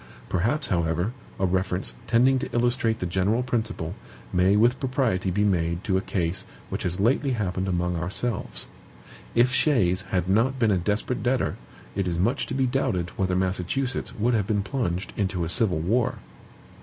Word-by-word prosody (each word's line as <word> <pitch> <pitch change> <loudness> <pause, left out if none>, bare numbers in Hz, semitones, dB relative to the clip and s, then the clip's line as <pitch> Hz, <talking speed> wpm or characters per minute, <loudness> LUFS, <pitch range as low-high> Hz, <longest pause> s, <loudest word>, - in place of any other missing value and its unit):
Perhaps, 120 - +1
however, 85 +4 0 0.3
a 95 - +2
reference, 95 0 -1
tending 130 +3 +4
to - - -4
illustrate 120 -1 +2
the 90 - -3
general 95 +7 +1
principle, 110 -9 -2 0.4
may 95 +2 +4
with 120 +4 +4
propriety 125 -8 0
be 100 +3 +1
made 85 -3 +1
to 95 - 0
a 95 - +2
case 95 0 -2 0.2
which - - -3
has 90 +2 -2
lately 130 +5 +2
happened 95 -4 -1
among 90 -1 0
ourselves. 95 +7 -3 0.7
If 120 +2 +4
Shays 100 - +3
had 90 -2 0
not 115 +8 +2
been 115 -4 +3
a 95 - +3
DESPERATE 105 +7 -1
DEBTOR, 125 +1 +1 0.4
it 100 -1 0
is 85 -1 -1
much 105 +9 +1
to - - -3
be 135 -1 +2
doubted 95 -9 0
whether 95 -4 -1
Massachusetts 95 +8 -1
would 120 +4 +1
have 105 -4 +1
been 105 -2 +1
plunged 100 -7 -2
into 95 -3 -1
a 80 - -2
civil 90 0 +2
war. 110 +10 +1
100 Hz, 170 wpm, -25 LUFS, 90-120 Hz, 0.7 s, tending